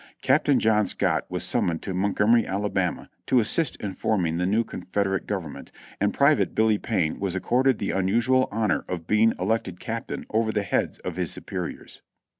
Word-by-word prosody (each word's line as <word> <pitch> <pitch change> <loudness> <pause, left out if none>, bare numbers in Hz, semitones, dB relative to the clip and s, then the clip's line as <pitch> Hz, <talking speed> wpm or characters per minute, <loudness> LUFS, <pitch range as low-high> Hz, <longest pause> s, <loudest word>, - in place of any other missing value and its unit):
Captain - - +3
John 105 -2 +2
Scott - - 0
was - - -1
summoned 85 -2 0
to 95 - -4
Montgomery, 105 +5 +2
Alabama, 95 -2 -2 0.2
to 130 - +4
assist 130 +6 +2
in 100 -2 -5
forming 90 -5 0
the 90 +1 0
new 110 +4 +2
Confederate 95 -2 -3
Government, 95 -7 -5 0.3
and - - +2
Pri - - +4
vate - - -1
Billy 110 -1 +3
Payne 90 -9 -1
was 95 -2 -2
accorded 125 +5 +2
the 100 - -2
unusual 120 +7 +2
honor 105 -8 0
of 85 -3 -4
being 110 +4 +3
elected 95 -2 -1
captain 115 +1 -5
over 110 0 +1
the 105 -1 -1
heads 95 - -1
of - - -6
his - - 0
superiors. - - -6
105 Hz, 175 wpm, -25 LUFS, 95-115 Hz, 0.3 s, to